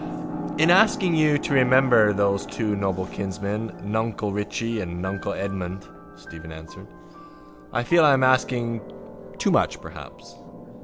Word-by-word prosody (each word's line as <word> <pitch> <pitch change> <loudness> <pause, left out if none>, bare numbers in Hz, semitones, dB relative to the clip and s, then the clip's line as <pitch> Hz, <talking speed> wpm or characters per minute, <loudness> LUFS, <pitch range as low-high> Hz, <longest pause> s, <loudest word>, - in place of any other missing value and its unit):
—In 160 +3 +4
asking 190 -2 +4
you 155 -2 +3
to 145 - -3
remember 130 -4 +5
those 100 -1 0
two 105 -3 -2
noble 95 -2 -2
kinsmen 100 +3 -4
nuncle 110 0 -2
Richie 110 +2 -3
and 85 -2 -6
nuncle 95 +2 -4
Edmund, 95 -1 -5 0.3
Stephen 80 0 -12
answered, 80 0 -12 0.8
I 120 - -1
feel 170 +6 +4
I 145 -2 +6
am 130 -1 +2
asking 125 -3 +1 0.6
too - - 0
much - - +1
perhaps. - - -12
110 Hz, 135 wpm, -24 LUFS, 100-130 Hz, 0.8 s, I